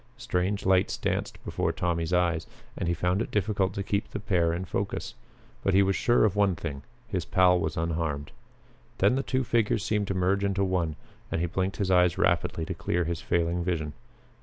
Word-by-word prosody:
Strange 95 Hz, +3 st, -1 dB
lights 95 Hz, 0 st, +3 dB
danced -, -, -2 dB
before -, -, 0 dB
Tommy's 85 Hz, -1 st, -1 dB
eyes, 85 Hz, -2 st, +1 dB, 0.3 s
and -, -, -3 dB
he 85 Hz, -, +2 dB
found 90 Hz, +4 st, +1 dB
it -, -, -3 dB
difficult 100 Hz, -2 st, 0 dB
to 100 Hz, -, -2 dB
keep 100 Hz, +1 st, -1 dB
the -, -, -5 dB
pair 90 Hz, -5 st, +1 dB
in 90 Hz, +3 st, -3 dB
focus. 100 Hz, +5 st, -3 dB, 0.5 s
But 95 Hz, -, +2 dB
he 100 Hz, -, +6 dB
was 95 Hz, 0 st, +1 dB
sure 120 Hz, -2 st, +3 dB
of 105 Hz, -2 st, +1 dB
one 100 Hz, -3 st, +3 dB
thing 75 Hz, -4 st, -5 dB, 0.3 s
his 95 Hz, -6 st, -2 dB
pal 90 Hz, 0 st, +4 dB
was 80 Hz, -2 st, -2 dB
unharmed. 80 Hz, -3 st, -2 dB, 0.7 s
Then 100 Hz, +5 st, +4 dB
the 135 Hz, -, +1 dB
two 130 Hz, -1 st, 0 dB
figures 115 Hz, -3 st, +1 dB
seemed 105 Hz, -2 st, 0 dB
to 95 Hz, -, -2 dB
merge 95 Hz, +2 st, +1 dB
into 100 Hz, 0 st, +1 dB
one 90 Hz, -5 st, 0 dB, 0.4 s
and -, -, 0 dB
he 85 Hz, -, +1 dB
blinked 95 Hz, +2 st, -2 dB
his 95 Hz, -2 st, 0 dB
eyes 90 Hz, -1 st, +4 dB
rapidly 80 Hz, -, +1 dB
to -, -, -3 dB
clear 90 Hz, 0 st, -1 dB
his 85 Hz, 0 st, -3 dB
failing 85 Hz, 0 st, 0 dB
vision. 80 Hz, -4 st, -2 dB
90 Hz, 200 wpm, -28 LUFS, 85-100 Hz, 0.7 s, he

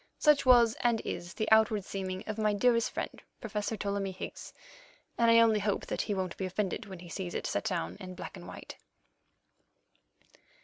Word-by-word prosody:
Such 300 Hz, -3 st, +4 dB
was, 240 Hz, -3 st, +7 dB
and 235 Hz, -2 st, +2 dB
is, 175 Hz, 0 st, -5 dB
the 215 Hz, -, -1 dB
outward 220 Hz, -2 st, +4 dB
seeming 190 Hz, -1 st, -4 dB
of 215 Hz, 0 st, -4 dB
my 215 Hz, -1 st, +2 dB
dearest 230 Hz, +2 st, +3 dB
friend, -, -, -5 dB, 0.2 s
Professor 210 Hz, +1 st, -3 dB
Ptolemy 200 Hz, -1 st, -2 dB
Higgs, 185 Hz, -, -8 dB, 0.6 s
and 235 Hz, 0 st, +3 dB
I 230 Hz, -, +7 dB
only 225 Hz, -2 st, +5 dB
hope 205 Hz, 0 st, -1 dB
that -, -, -2 dB
he 205 Hz, -, -2 dB
won't 185 Hz, -2 st, -2 dB
be 190 Hz, -, -2 dB
offended 195 Hz, +3 st, -2 dB
when 190 Hz, -2 st, -8 dB
he 175 Hz, +1 st, -11 dB
sees 175 Hz, +1 st, -5 dB
it -, -, -3 dB
set -, -, -1 dB
down 180 Hz, -6 st, -2 dB
in 185 Hz, -2 st, -8 dB
black 180 Hz, +2 st, -8 dB
and 175 Hz, -2 st, -10 dB
white. -, -, -9 dB
205 Hz, 185 wpm, -31 LUFS, 185-225 Hz, 0.6 s, was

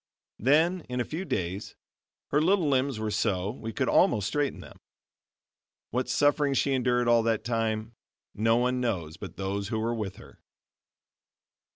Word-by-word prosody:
Then 160 Hz, -, +3 dB
in 125 Hz, 0 st, -2 dB
a 120 Hz, -, 0 dB
few 170 Hz, +5 st, -5 dB
days 95 Hz, -, -3 dB, 0.5 s
her 150 Hz, -, +2 dB
little 180 Hz, 0 st, +3 dB
limbs 135 Hz, -2 st, +1 dB
were 110 Hz, 0 st, -2 dB
so 100 Hz, -2 st, 0 dB
we 115 Hz, -1 st, -6 dB
could -, -, -1 dB
almost 100 Hz, -1 st, +3 dB
straighten 145 Hz, -1 st, -1 dB
them. -, -, -13 dB, 1.1 s
What 125 Hz, +2 st, -1 dB
suffering 145 Hz, +1 st, +2 dB
she 140 Hz, +1 st, +2 dB
endured 125 Hz, -1 st, +1 dB
all 120 Hz, -1 st, +5 dB
that 115 Hz, -1 st, 0 dB
time, 115 Hz, -1 st, -1 dB, 0.4 s
no 115 Hz, +2 st, +2 dB
one 125 Hz, +1 st, +1 dB
knows 85 Hz, -10 st, -2 dB
but -, -, -9 dB
those 100 Hz, +1 st, -2 dB
who 110 Hz, -, -2 dB
were 115 Hz, +2 st, 0 dB
with 105 Hz, -4 st, -4 dB
her. -, -, -15 dB
120 Hz, 160 wpm, -28 LUFS, 110-135 Hz, 1.1 s, all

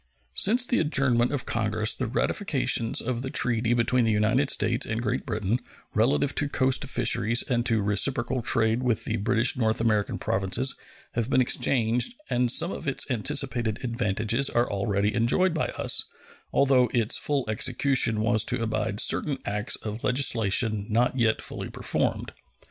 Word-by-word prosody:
Since 240 Hz, -, +3 dB
the 245 Hz, -, 0 dB
adjournment 135 Hz, -6 st, +1 dB
of 145 Hz, -4 st, -2 dB
Congress 110 Hz, -1 st, 0 dB
the 130 Hz, -, -4 dB
ratifications 130 Hz, -, 0 dB
of 120 Hz, 0 st, -3 dB
the 130 Hz, -, -5 dB
treaty 120 Hz, -2 st, +1 dB
between 120 Hz, +1 st, +1 dB
the 115 Hz, -, +1 dB
United 110 Hz, +6 st, +1 dB
States 115 Hz, +4 st, +1 dB
and 110 Hz, 0 st, -3 dB
Great 120 Hz, +4 st, -3 dB
Britain 110 Hz, 0 st, -2 dB, 0.3 s
relative 135 Hz, +5 st, +1 dB
to 145 Hz, -, +1 dB
coast 130 Hz, -1 st, +1 dB
fisheries 115 Hz, -2 st, +2 dB
and 120 Hz, -3 st, 0 dB
to 115 Hz, -4 st, +1 dB
reciprocal 120 Hz, +4 st, 0 dB
trade 115 Hz, +1 st, +1 dB
with 125 Hz, -3 st, -1 dB
the 110 Hz, -, -2 dB
British 115 Hz, +3 st, +2 dB
North 110 Hz, -3 st, 0 dB
American 110 Hz, -3 st, 0 dB
Provinces 95 Hz, +8 st, 0 dB, 0.4 s
have 115 Hz, +1 st, -3 dB
been 130 Hz, -, +2 dB
exchanged, 125 Hz, -, +1 dB, 0.2 s
and 125 Hz, 0 st, +1 dB
some 175 Hz, -, +2 dB
of 160 Hz, -, -7 dB
its 135 Hz, 0 st, -1 dB
anticipated 125 Hz, -2 st, -1 dB
advantages 115 Hz, +1 st, 0 dB
are 120 Hz, +1 st, 0 dB
already 100 Hz, +1 st, -1 dB
enjoyed 140 Hz, +10 st, +2 dB
by 160 Hz, -, -1 dB
us, -, -, +1 dB, 0.5 s
although 130 Hz, -3 st, +3 dB
its 115 Hz, -2 st, +1 dB
full 140 Hz, -3 st, -2 dB
execution 115 Hz, 0 st, +1 dB
was 110 Hz, -1 st, +2 dB
to 125 Hz, -2 st, -1 dB
abide 110 Hz, -2 st, -2 dB
certain 140 Hz, +2 st, +2 dB
acts 105 Hz, +3 st, -1 dB
of 110 Hz, +1 st, -7 dB
legislation 110 Hz, -5 st, +2 dB
not 120 Hz, +4 st, +1 dB
yet 110 Hz, -2 st, +1 dB
fully -, -, -4 dB
performed. -, -, -2 dB
120 Hz, 160 wpm, -25 LUFS, 110-130 Hz, 0.5 s, Since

